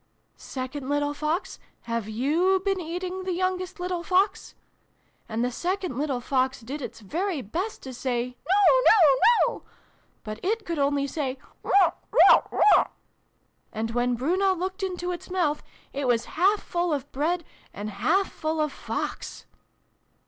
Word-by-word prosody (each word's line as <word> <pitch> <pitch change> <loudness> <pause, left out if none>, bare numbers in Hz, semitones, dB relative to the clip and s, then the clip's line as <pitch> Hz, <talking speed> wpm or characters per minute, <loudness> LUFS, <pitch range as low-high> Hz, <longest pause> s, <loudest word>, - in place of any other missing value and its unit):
'Second 260 +1 -6
little 290 0 0
Fox, 315 +6 -2 0.2
have 230 -2 -3
you 315 - +2
been 390 -1 +1
eating 360 +3 -4
the 370 -1 -2
youngest 370 0 -2
little 360 -1 -2
Fox? 375 +3 +1 0.4
' - - -40
And 230 +2 0
the 250 - -1
second 365 +2 -2
little 275 -2 -1
Fox 260 +1 0
did 275 +6 -6
its 235 -2 -7
very 330 - -2
best 360 - -4
to 260 - -7
say 245 -1 -2 0.2
'No 410 +6 +5
no 320 -11 +7 0.3
no!' - - -6 0.6
but 215 0 -6
it 435 +3 -1
could 335 -3 -3
only 280 0 +1
say 275 -2 -3 0.3
'Weuchk! 390 -3 +4
Weuchk! - - +6
Weuchk! 420 - +5 0.4
' - - -44
And 225 +1 -3
when 245 +1 +1
Bruno 370 +10 +1
looked 375 +3 -4
into 360 -2 -2
its 350 - -7
mouth, 335 -5 0 0.3
it 275 -1 -2
was 235 -2 +2
half 390 +5 +3
full 345 -1 -1
of 285 -2 -3
Bread, 335 +5 0 0.3
and 210 +1 -6
half 345 - +1
full 315 0 -3
of 305 -1 +1
Fox - - -5
310 Hz, 155 wpm, -26 LUFS, 255-370 Hz, 0.6 s, no